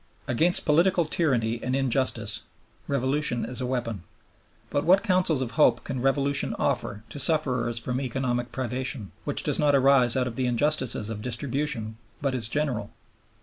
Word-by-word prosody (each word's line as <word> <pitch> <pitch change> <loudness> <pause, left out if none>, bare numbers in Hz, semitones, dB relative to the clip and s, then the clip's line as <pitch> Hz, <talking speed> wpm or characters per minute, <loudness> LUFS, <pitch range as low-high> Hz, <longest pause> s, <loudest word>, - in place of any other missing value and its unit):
Against 165 +9 +1
political 170 +3 +3
tyranny 120 -8 0
and 130 +1 -2
injustice 120 -5 0 0.5
Revolution 140 -1 0
is 125 0 -5
a 125 - -2
weapon. 115 -6 -3 0.7
But 145 - 0
what 190 +4 +4
counsels 180 -7 +2
of 120 - -5
hope 150 - +3
can 130 -3 -4
Revolution 140 +1 +1
offer 105 +1 -2
to 145 - -7
sufferers 130 -7 +3
from 125 +3 -2
economic 125 -1 -2
privation, 130 -3 -3
which - - -3
does - - +1
not 145 -1 +3
arise 135 -3 +4
out 130 - +1
of 120 -2 -6
the 130 -1 0
injustices 125 -3 +1
of 105 -1 -6
distribution 120 -1 -2 0.2
but 140 -2 -1
is 120 -4 +1
general? 125 -6 -2
130 Hz, 155 wpm, -26 LUFS, 120-145 Hz, 0.7 s, what